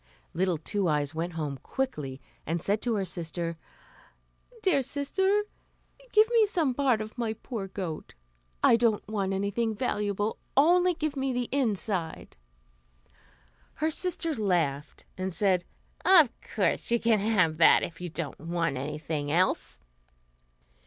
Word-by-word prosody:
Little 180 Hz, 0 st, +1 dB
Two 190 Hz, +5 st, -1 dB
Eyes 150 Hz, -1 st, 0 dB
went 170 Hz, +2 st, -3 dB
home 150 Hz, -4 st, -4 dB
quickly, 150 Hz, -, -3 dB, 0.3 s
and 165 Hz, +3 st, 0 dB
said 205 Hz, +6 st, 0 dB
to 235 Hz, -2 st, 0 dB
her 195 Hz, -2 st, -1 dB
sister, 170 Hz, -1 st, -4 dB, 1.1 s
"Dear 330 Hz, -8 st, +3 dB
sister, 380 Hz, +10 st, +1 dB, 0.7 s
give 430 Hz, +1 st, +6 dB
me 455 Hz, -3 st, +5 dB
some 325 Hz, -10 st, +1 dB
part 255 Hz, -4 st, +2 dB
of 215 Hz, +3 st, -8 dB
my 225 Hz, -2 st, -1 dB
poor 220 Hz, -2 st, -6 dB
goat. 185 Hz, -, -6 dB, 0.5 s
I 230 Hz, -, +6 dB
don't 225 Hz, -3 st, +1 dB
want 200 Hz, -3 st, -1 dB
anything 205 Hz, +3 st, -1 dB
valuable; 205 Hz, -2 st, -1 dB, 0.2 s
only 355 Hz, +4 st, +5 dB
give 310 Hz, -2 st, -2 dB
me 270 Hz, -1 st, -1 dB
the 245 Hz, -1 st, -2 dB
inside." 210 Hz, -9 st, -1 dB, 1.4 s
Her 315 Hz, +2 st, 0 dB
sister 335 Hz, -1 st, -1 dB
laughed, 165 Hz, -, -1 dB
and 190 Hz, 0 st, -2 dB
said, 185 Hz, 0 st, +1 dB, 0.4 s
"Of 330 Hz, -10 st, +7 dB, 0.2 s
course -, -, +1 dB
you 235 Hz, 0 st, +3 dB
can 225 Hz, -2 st, +3 dB
have 190 Hz, -7 st, +2 dB
that, 160 Hz, -, +6 dB
if 170 Hz, +1 st, -6 dB
you 175 Hz, -, -4 dB
don't 160 Hz, -2 st, -5 dB
want 165 Hz, -3 st, -1 dB
anything 150 Hz, +1 st, -3 dB
else." 180 Hz, +4 st, +1 dB
205 Hz, 140 wpm, -28 LUFS, 170-265 Hz, 1.4 s, Of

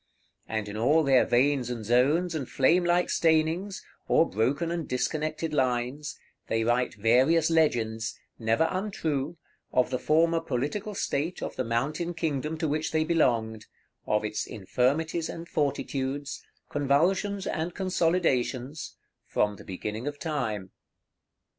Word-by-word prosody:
And 110 Hz, -1 st, -2 dB
in 105 Hz, -, -6 dB
all 145 Hz, +8 st, +4 dB
their 135 Hz, -3 st, +5 dB
veins 130 Hz, 0 st, +2 dB
and 115 Hz, -3 st, -4 dB
zones, 145 Hz, -, +3 dB
and 145 Hz, -6 st, -4 dB
flame 170 Hz, +7 st, +3 dB
like 175 Hz, +1 st, +2 dB
stainings, 165 Hz, +5 st, +1 dB, 0.2 s
or 165 Hz, -, +4 dB
broken 140 Hz, +10 st, 0 dB
and 170 Hz, -2 st, -3 dB
disconnected 155 Hz, +4 st, -1 dB
lines, 130 Hz, +2 st, -1 dB, 0.3 s
they 115 Hz, 0 st, 0 dB
write 120 Hz, 0 st, +1 dB
various 130 Hz, +10 st, +3 dB
legends, 115 Hz, -8 st, +1 dB, 0.2 s
never 115 Hz, +7 st, +2 dB
untrue, 170 Hz, -6 st, -2 dB, 0.3 s
of 125 Hz, 0 st, +2 dB
the 125 Hz, -, 0 dB
former 165 Hz, +3 st, +3 dB
political 165 Hz, -, -3 dB
state 165 Hz, +1 st, -2 dB
of -, -, -4 dB
the 130 Hz, -, -1 dB
mountain 150 Hz, +9 st, -1 dB
kingdom 155 Hz, -1 st, -2 dB
to 160 Hz, -, -1 dB
which 155 Hz, +2 st, -1 dB
they 155 Hz, 0 st, +2 dB
belonged, 115 Hz, -9 st, +1 dB, 0.4 s
of 105 Hz, 0 st, +1 dB
its 105 Hz, 0 st, -3 dB
infirmities 145 Hz, -, 0 dB
and 170 Hz, 0 st, -7 dB
fortitudes, 140 Hz, -2 st, -2 dB, 0.2 s
convulsions 180 Hz, +8 st, +1 dB
and 165 Hz, +2 st, -2 dB
consolidations, 160 Hz, -7 st, 0 dB, 0.3 s
from 105 Hz, -1 st, 0 dB
the -, -, -12 dB
beginning 105 Hz, +6 st, -5 dB
of 145 Hz, 0 st, -3 dB
time. 120 Hz, -, -3 dB
145 Hz, 135 wpm, -28 LUFS, 120-165 Hz, 0.4 s, their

